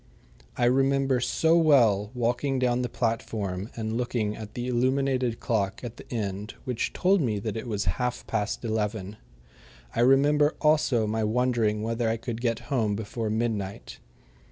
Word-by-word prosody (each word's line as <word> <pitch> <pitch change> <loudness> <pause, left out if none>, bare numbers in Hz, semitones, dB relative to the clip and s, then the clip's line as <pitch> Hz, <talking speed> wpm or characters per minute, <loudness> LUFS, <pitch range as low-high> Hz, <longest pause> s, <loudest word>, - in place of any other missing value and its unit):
I 120 - +2
remember 135 +1 +3
so 160 +6 +2
well 120 -11 +4
walking 125 +3 0
down 125 -1 +1
the 125 - -2
platform 110 -4 -2
and 110 -1 -3
looking 115 -4 -1
at 110 -1 -9
the 120 0 -3
illuminated 130 -1 +1
clock 105 -3 -1
at 120 -1 -7
the - - -13
end 105 -3 -4
which 125 -2 -2
told 190 0 +2
me 110 -7 0
that 105 +2 -4
it 115 +2 -5
was 105 -3 -2 0.2
half 125 0 -2
past 110 +2 -2
eleven. 105 -2 -2 0.8
I - - -1
remember 145 +4 +4
also 150 -7 +3
my 110 +1 -1
wondering 110 -2 +1
whether 115 0 0
I 115 - 0
could 115 0 -5
get 115 -2 0
home 110 -5 +1
before 110 +1 -4
midnight. 110 -3 -3
115 Hz, 155 wpm, -27 LUFS, 110-125 Hz, 0.8 s, well